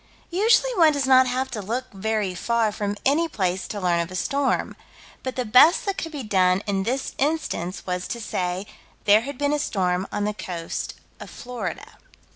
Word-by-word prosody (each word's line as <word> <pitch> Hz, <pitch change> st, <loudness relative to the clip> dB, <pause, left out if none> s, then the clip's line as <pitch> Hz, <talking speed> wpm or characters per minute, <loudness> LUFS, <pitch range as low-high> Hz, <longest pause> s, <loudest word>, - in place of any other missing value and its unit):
Usually 455 Hz, +7 st, +3 dB
one 320 Hz, -3 st, +6 dB
does 285 Hz, -2 st, 0 dB
not 260 Hz, -1 st, +6 dB
have 260 Hz, +1 st, -1 dB
to 220 Hz, -4 st, -4 dB
look 245 Hz, +5 st, -4 dB
very 210 Hz, -1 st, -1 dB
far 225 Hz, +4 st, +1 dB
from 205 Hz, 0 st, -3 dB
any 310 Hz, +5 st, +3 dB
place 185 Hz, -, -2 dB
to 205 Hz, -, -5 dB
learn 175 Hz, -2 st, +1 dB
of 170 Hz, 0 st, -2 dB
a 185 Hz, -, -8 dB
storm. 280 Hz, +7 st, 0 dB, 0.5 s
But 260 Hz, -1 st, -4 dB
the 250 Hz, -, -2 dB
best 250 Hz, +10 st, +6 dB
that 395 Hz, -1 st, -1 dB
could 325 Hz, -, -5 dB
be 290 Hz, -4 st, -5 dB
done 190 Hz, -2 st, +2 dB
in 195 Hz, -2 st, 0 dB
this 255 Hz, +7 st, -2 dB
instance 275 Hz, -, -1 dB
was 180 Hz, 0 st, -3 dB
to 235 Hz, -, -4 dB
say: 185 Hz, -3 st, -2 dB, 0.4 s
"There 210 Hz, +1 st, +6 dB
had 275 Hz, +2 st, -6 dB
been 285 Hz, +1 st, +1 dB
a 295 Hz, -, +1 dB
storm 185 Hz, -8 st, 0 dB
on 205 Hz, -, -2 dB
the 210 Hz, +1 st, 0 dB
coast 170 Hz, -5 st, -5 dB, 0.2 s
of -, -, -9 dB
Florida." 245 Hz, 0 st, -7 dB
220 Hz, 195 wpm, -24 LUFS, 190-275 Hz, 0.5 s, one